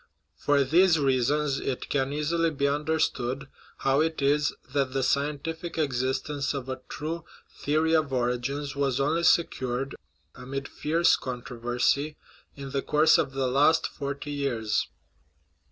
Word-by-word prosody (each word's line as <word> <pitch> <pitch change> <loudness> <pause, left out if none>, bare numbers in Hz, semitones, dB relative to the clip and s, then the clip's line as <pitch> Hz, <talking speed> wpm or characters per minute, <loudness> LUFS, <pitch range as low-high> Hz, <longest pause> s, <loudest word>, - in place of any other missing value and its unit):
For 145 -1 +2
these 170 +5 +4
reasons 140 +1 +1
it 130 - -3
can 135 -1 0
easily 165 +3 +1
be 140 -2 0
under 150 +3 0
stood 135 -2 -1 0.3
how 135 +2 +2
it 160 0 -1
is 145 +1 +2 0.2
that 135 -2 0
the 135 -1 0
scientific 150 +6 -2
existence 140 0 -1
of 135 -2 -5
a 130 0 -4
true 160 +3 -4 0.4
the 145 +2 +2
ory 160 +1 +2
of 155 -3 +1
origins 130 +3 -1
was 140 -2 0
only 150 +5 +1
secured, 135 -6 +1 0.4
amid 135 +2 -6
fierce 165 +3 +2
controversy, 125 +4 -1 0.4
in 140 -1 -8
the 140 0 0
course 150 +3 +4
of 135 - -1
the 135 -1 0
last 145 +5 +3
forty 140 +1 -5
years. 120 -7 -1
140 Hz, 140 wpm, -27 LUFS, 130-150 Hz, 0.4 s, these